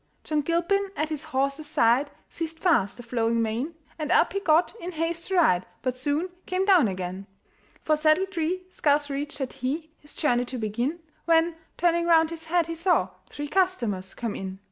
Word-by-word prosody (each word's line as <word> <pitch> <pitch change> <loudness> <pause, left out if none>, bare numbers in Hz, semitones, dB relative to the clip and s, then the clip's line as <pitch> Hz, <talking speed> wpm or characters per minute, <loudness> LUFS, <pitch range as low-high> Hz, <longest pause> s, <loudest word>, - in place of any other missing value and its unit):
John 305 -1 0
Gilpin 345 +6 +1
at 310 +1 -1
his 310 -2 -4
horse's 275 +3 -1
side 245 +5 +3 0.2
Seized 325 -1 -5
fast 320 - +2
the 240 - -9
flowing 230 -1 0
mane, 230 +9 -1 0.2
And 305 -1 -2
up - - +4
he 395 - 0
got, 330 -2 +3
in 360 +2 -5
haste 330 +1 -2
to 385 - -1
ride, 185 - +3 0.2
But 255 -1 0
soon 290 +7 -1 0.2
came 370 +1 0
down 365 - +6
again; 185 0 -5 0.6
For 310 - +3
saddletree 340 +3 +1
scarce 290 -1 +2
reached 290 +2 -4
had 265 -3 -4
he, 305 +6 -3
His 295 - -15
journey 245 -5 +1
to 255 +1 -6
begin, 240 +9 -2 0.2
When, 330 0 +3 0.2
turning 340 -1 +2
round 325 -1 +5
his 325 -1 -7
head, 340 +1 +2
he 330 - -4
saw 340 +2 +2 0.2
Three 290 0 -5
customers 240 - 0
come 230 -3 -3
in. 190 0 -5
310 Hz, 185 wpm, -26 LUFS, 245-335 Hz, 0.6 s, down